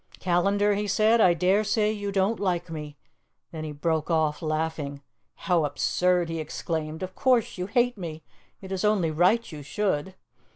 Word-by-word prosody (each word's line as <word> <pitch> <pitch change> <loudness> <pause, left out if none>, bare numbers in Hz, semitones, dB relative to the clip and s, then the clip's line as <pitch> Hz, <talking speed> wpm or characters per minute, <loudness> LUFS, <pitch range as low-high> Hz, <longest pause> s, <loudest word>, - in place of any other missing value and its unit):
"Callandar," 200 +4 +2
he 205 +1 -2
said, 215 +3 +3
"I 175 -4 +5
dare 190 +5 +2
say 215 0 +1
you 205 -2 -4
don't 195 +3 +1
like 175 -3 -1
me 150 -2 -7 0.3
" - - -51
Then 160 -2 -6
he 155 - -5
broke 155 +2 -1
off, 160 -2 +1
laughing. 155 -3 -3 0.3
"How 175 -4 +1
absurd!" 175 +4 +1
he 165 0 -4
exclaimed. 155 +1 -4
"Of 185 0 -5
course 245 -6 +1
you 180 - -2
hate 240 +1 +1
me; 160 -3 -6 0.4
it 190 -1 -9
is 190 -1 -2
only 205 -6 +2
right 185 +9 +2
you 150 -2 -8
should. 190 +2 -2
180 Hz, 175 wpm, -26 LUFS, 160-205 Hz, 0.4 s, I